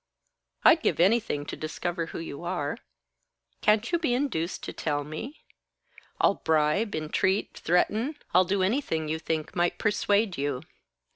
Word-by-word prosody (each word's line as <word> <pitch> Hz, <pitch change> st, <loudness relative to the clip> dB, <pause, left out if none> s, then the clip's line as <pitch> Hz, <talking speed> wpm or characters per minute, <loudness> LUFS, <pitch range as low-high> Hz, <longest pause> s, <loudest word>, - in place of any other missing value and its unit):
I'd 320 Hz, -, +7 dB
give -, -, +1 dB
anything 185 Hz, -6 st, +2 dB
to -, -, -5 dB
discover 165 Hz, +2 st, -3 dB
who -, -, -7 dB
you 165 Hz, -1 st, -6 dB
are. 175 Hz, +1 st, -2 dB, 0.8 s
Can't 215 Hz, +5 st, +3 dB
you 340 Hz, -, +2 dB
be 305 Hz, -7 st, +1 dB
induced 225 Hz, -, -2 dB
to -, -, -5 dB
tell 145 Hz, -2 st, -1 dB
me? 155 Hz, -, -7 dB, 0.8 s
I'll -, -, +5 dB
bribe, 160 Hz, +7 st, +2 dB
entreat, 160 Hz, +5 st, 0 dB
threaten 220 Hz, -, +1 dB, 0.2 s
I'll 185 Hz, +1 st, +6 dB
do 190 Hz, +1 st, +1 dB
anything 185 Hz, -, 0 dB
you 160 Hz, +1 st, -1 dB
think 160 Hz, -1 st, -3 dB
might 175 Hz, -1 st, +1 dB
persuade 205 Hz, -3 st, +1 dB
you." 140 Hz, -2 st, -2 dB
180 Hz, 145 wpm, -27 LUFS, 155-215 Hz, 0.8 s, I'd